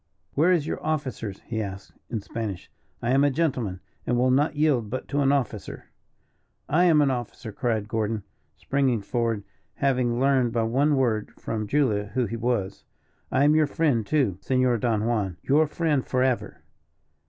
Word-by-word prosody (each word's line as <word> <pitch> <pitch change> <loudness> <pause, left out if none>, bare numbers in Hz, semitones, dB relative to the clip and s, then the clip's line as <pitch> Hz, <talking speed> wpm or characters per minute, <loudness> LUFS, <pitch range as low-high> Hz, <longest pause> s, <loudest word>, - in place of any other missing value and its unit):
"Where 160 +6 +3
is 170 -5 +2
your - - -4
officer?" 140 -8 -2
he 110 +3 -5
asked, 100 -1 -7 0.2
in 115 -3 -3
Spanish. 105 -3 -5 0.3
"I 120 - +1
am 135 +2 +4
a 145 - +5
gentleman, 130 - -1 0.3
and 120 - +2
will 125 +1 +3
not 145 +4 +2
yield 145 -8 +2
but 130 - -4
to 145 +1 +1
an 135 0 +3
officer." 125 -7 -3 0.8
"I 175 +3 +3
am 155 -4 +5
an 140 - +2
officer," 120 -1 -5
cried 110 -2 -1
Gordon, 110 -1 -1 0.3
springing 135 -5 0
forward, 115 -2 -1 0.3
having 125 -3 +1
learned 130 -3 +2
by 115 -1 +1
one 140 +6 +2
word 115 -5 +1
from 110 -2 -3
Julia 110 -6 +1
who 125 -2 +2
he 115 - -4
was. 115 -4 -2 0.5
"I 135 - +3
am 150 +1 +5
your 155 -1 +4
friend, 145 -7 +1
too, 105 - 0
Senor 130 +1 +2
Don 110 -2 0
Juan 105 -7 -1
your 150 +3 +3
friend 150 -3 0
forever." 130 -1 -1
125 Hz, 170 wpm, -25 LUFS, 110-140 Hz, 0.8 s, a